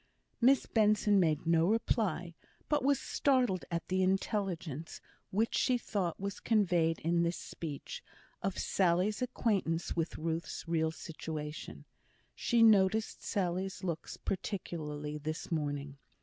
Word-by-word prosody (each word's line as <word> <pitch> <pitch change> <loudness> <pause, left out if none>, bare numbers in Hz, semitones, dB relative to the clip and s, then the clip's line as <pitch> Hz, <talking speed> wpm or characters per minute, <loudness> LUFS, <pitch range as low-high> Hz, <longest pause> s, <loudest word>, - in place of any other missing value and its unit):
Miss 265 +3 +5
Benson 210 -2 +3
made 160 -3 +2
no 165 0 +4
reply; 195 -5 0 0.3
but 295 -3 +1
was 280 -1 +3
startled 250 -9 +1
at 170 -1 -3
the 185 0 +1
intelligence, 185 - -1 0.3
which 220 +4 0
she 255 -2 +3
thought 195 -7 -2
was 200 0 -4
conveyed 175 -7 +2
in 170 +1 +2
this 170 +1 0
speech, 150 -4 -7 0.4
of 195 -1 -2
Sally's 190 +4 +1
acquaintance 200 -9 0
with 165 -1 -2
Ruth's 165 +1 -3
real 160 -1 +1
situation. 155 -1 -6 0.5
She 235 -2 +2
noticed 215 0 +4
Sally's 190 0 -2
looks 170 -3 -4
particularly 150 -6 -4
this 155 +3 -5
morning. 145 -3 -2
180 Hz, 120 wpm, -33 LUFS, 160-210 Hz, 0.5 s, Miss